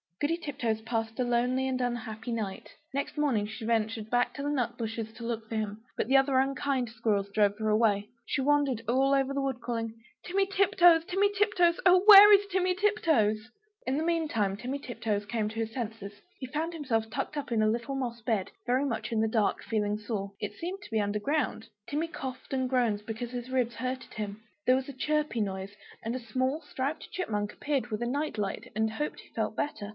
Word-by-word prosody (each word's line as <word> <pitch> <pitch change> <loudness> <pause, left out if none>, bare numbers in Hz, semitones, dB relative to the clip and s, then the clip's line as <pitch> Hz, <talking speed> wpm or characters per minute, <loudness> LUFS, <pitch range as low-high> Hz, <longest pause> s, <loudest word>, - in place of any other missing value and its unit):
Goody 315 +3 +1
Tiptoes 255 -9 -2
passed 225 0 -3
a - - +3
lonely 250 +2 +1
and 255 -1 -1
unhappy 240 -1 -3
night. 210 -4 -4 0.2
Next 280 +2 -3
morning 255 -9 +1
she 220 +1 -7
ventured 220 -1 0
back 245 0 +2
to 280 - -5
the 290 - -1
nut 245 -4 -1
bushes 225 -1 -4
to 235 - -10
look 225 -2 -4
for 225 - -3
him; 215 0 -3
but - - 0
the 270 +2 +5
other 270 0 +3
unkind 270 -2 0
squirrels 205 -3 0
drove 205 0 +2
her 215 0 -1
away. 210 -2 +3 0.2
She 270 - -1
wandered 280 -4 +2
all 265 +3 +3
over 275 0 +1
the 280 - 0
wood, 265 -3 -2
calling 230 -2 -3 0.3
"Timmy 390 +2 +1
Tiptoes! 380 -4 +5
Timmy 395 +2 +2
Tiptoes! 390 -4 +3
Oh, 365 0 +6
where 415 0 +11
is 405 0 +6
Timmy 365 0 +2
Tiptoes?" 250 - +2 0.4
In 265 +2 +1
the 310 - 0
meantime 290 - 0
Timmy 255 +6 -3
Tiptoes 220 -6 -3
came 215 0 -1
to 220 - -10
his 225 0 -2
senses. 220 -4 -5 0.3
He 260 - -5
found 315 +6 -2
himself 235 -8 -1
tucked 270 +6 -3
up 285 -4 -4
in 220 -2 +2
a 215 - +4
little 235 +5 -2
moss 240 -3 -3
bed, 220 -5 -1 0.2
very 255 +3 +2
much 235 -4 -3
in 220 -1 +1
the 220 - +2
dark, 220 -2 +1
feeling 210 -2 0
sore; 205 -2 -4
it 210 - -4
seemed 370 +4 -5
to - - -12
be 220 - +1
under 205 +1 -1
ground. 285 -1 -1 0.2
Timmy 305 +3 -1
coughed 265 -5 -7
and 260 -1 0
groaned, 230 -5 +1
because 230 +2 -4
his 245 0 -5
ribs 250 -2 0
hurted 255 +1 -4
him. 210 0 -5 0.2
There 255 - +6
was 265 +1 -2
a - - -6
chirpy 300 -5 0
noise, 195 0 -3 0.3
and 230 +2 -2
a - - -2
small 260 +6 -1
striped 280 +2 -4
Chipmunk 210 - -2
appeared 280 -4 -1
with 215 0 -3
a - - -1
night 285 -1 -2
light, 200 -2 -3
and 220 0 +1
hoped 295 +7 -3
he - - -19
felt - - -2
better? 215 -8 -3
245 Hz, 210 wpm, -29 LUFS, 220-285 Hz, 0.4 s, where